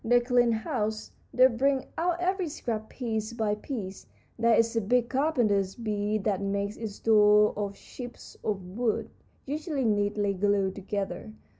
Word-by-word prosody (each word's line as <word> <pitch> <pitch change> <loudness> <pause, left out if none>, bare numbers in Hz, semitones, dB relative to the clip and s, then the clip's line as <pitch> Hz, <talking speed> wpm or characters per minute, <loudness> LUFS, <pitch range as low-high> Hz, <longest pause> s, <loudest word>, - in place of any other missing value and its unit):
They 245 +2 +5
clean 245 -1 +3
house; 220 -1 -2 0.2
they 255 - +6
bring 265 +2 +2
out 345 +1 0
every 365 -1 0
scrap 220 -6 -4
piece 225 -3 -3
by 220 -3 0
piece. 210 -3 -6 0.3
There 230 0 +4
is 230 0 +2
a 225 - +2
big 240 +3 +1
carpenter 250 -8 +2 0.2
bee 210 0 0
that 200 -1 -1
makes 200 +1 -1
its 220 -3 -6
doors 210 -1 +5
of 200 -1 -3
chips 245 +4 -10
of 195 -4 -2
wood, 220 +5 -2 0.3
usually 295 -1 -2
neatly 205 -1 +1
glued 195 0 +1
together. 195 0 -4
220 Hz, 150 wpm, -28 LUFS, 205-245 Hz, 0.3 s, they